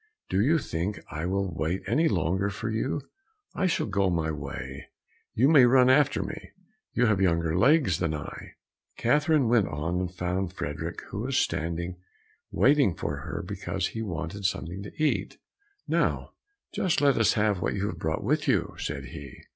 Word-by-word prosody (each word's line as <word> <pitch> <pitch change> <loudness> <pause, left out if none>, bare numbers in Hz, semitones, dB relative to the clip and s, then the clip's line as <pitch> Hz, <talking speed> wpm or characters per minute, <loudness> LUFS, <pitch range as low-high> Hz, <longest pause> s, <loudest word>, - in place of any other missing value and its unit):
Do 95 - +2
you 150 +9 +4
think 95 - -3
I 80 +2 -3
will 95 -1 -1
wait 80 +3 -2
any 160 +2 +2
longer 95 - 0
for 105 +3 -4
you? 120 +6 -1 0.5
I 190 - +1
shall 180 - 0
go 100 -2 +1
my 80 -3 0
way, 70 -1 -6 0.5
you 125 +5 +4
may 145 -5 +7
run 130 +1 +6
after 145 +2 +3
me; - - -8 0.4
you 125 - +3
have 105 -4 +2
younger 85 -3 +2
legs 135 - +4
than 80 -1 0
I." 75 - -8 0.4
Catherine 150 +2 +3
went 115 -4 +3
on 80 +4 -2
and 90 -1 -2
found 90 0 -2
Frederick, 75 -6 -5
who - - -5
was - - -1
standing 85 +2 -1 0.5
waiting 140 - +3
for - - -3
her - - -5
because - - -3
he 115 - -5
wanted 90 -1 -4
something 95 -1 -2
to 100 - -8
eat. 155 -1 0 0.5
"Now - - 0 0.4
just 180 - +1
let 140 -2 +3
us 115 - +4
have 105 -3 +1
what - - 0
you 100 0 -1
have 90 -5 -4
brought 80 -1 -2
with - - 0
you," - - +1
said - - -4
he. 70 -3 -10
95 Hz, 175 wpm, -27 LUFS, 85-120 Hz, 0.5 s, may